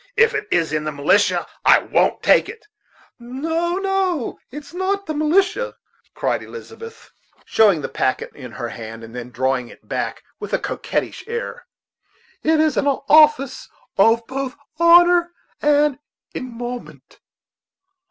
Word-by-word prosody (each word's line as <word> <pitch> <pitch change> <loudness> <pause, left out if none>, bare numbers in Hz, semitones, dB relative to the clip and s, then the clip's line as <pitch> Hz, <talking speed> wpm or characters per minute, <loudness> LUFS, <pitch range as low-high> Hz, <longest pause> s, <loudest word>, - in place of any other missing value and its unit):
If 460 -1 +5
it 425 0 -3
is 165 -2 +1
in 155 0 0
the 155 - -3
militia, 150 +8 +2 0.2
I - - +7
won't - - 0
take - - +4
it. 455 - -11 0.5
"No, 320 +8 -2
no, 385 - -1
it 295 +4 -8
is 290 - -16
not 380 +2 -1
in - - -27
the 310 - -3
militia," 380 +11 +1 0.4
cried - - -1
Elizabeth, 460 0 -11 0.3
showing 205 -8 +3
the - - -2
packet 130 - -1
in 125 -5 -10
her 120 - -5
hand, 115 0 -8
and 115 +1 -11
then 125 0 -6
drawing 130 0 -1
it - - -17
back - - -3 0.2
with - - -7
a - - +4
coquettish - - -3
air; 475 +1 -5 0.7
"it 315 0 +2
is 310 -1 +2
an 285 - +1
office 285 -1 +3 0.3
of 230 +1 +4
both 270 +1 -4 0.2
honor 345 0 +6 0.3
and 295 -2 +3 0.3
emolument." 245 -1 -7
290 Hz, 145 wpm, -20 LUFS, -, 0.7 s, I